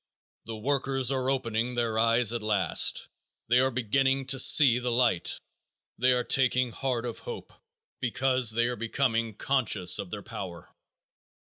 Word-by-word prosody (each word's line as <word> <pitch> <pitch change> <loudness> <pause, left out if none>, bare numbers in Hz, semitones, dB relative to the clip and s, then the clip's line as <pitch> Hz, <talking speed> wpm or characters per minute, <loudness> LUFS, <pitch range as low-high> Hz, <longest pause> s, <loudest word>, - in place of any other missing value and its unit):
The 115 - -7
workers 135 +1 0
are 130 -1 -1
opening 120 -2 -2
their 115 -2 -1
eyes 115 0 +2
at 120 - -3
last. 105 -3 +1 0.4
They 120 +1 +4
are 130 +1 +2
beginning 135 +2 0
to 135 - -3
see 130 -2 +6
the 125 0 -3
light. 120 -7 +1 0.6
They 125 +2 +3
are 125 -1 +1
taking 125 -2 +1
heart 125 -1 -3
of 120 - -6
hope 475 - -9 0.5
because 130 0 +1
they 120 +2 +3
are 120 0 -2
becoming 115 -1 -2
conscious 110 -9 +1
of 95 - -6
their 100 +2 -7
power. 85 -3 -9
120 Hz, 150 wpm, -27 LUFS, 115-130 Hz, 0.6 s, see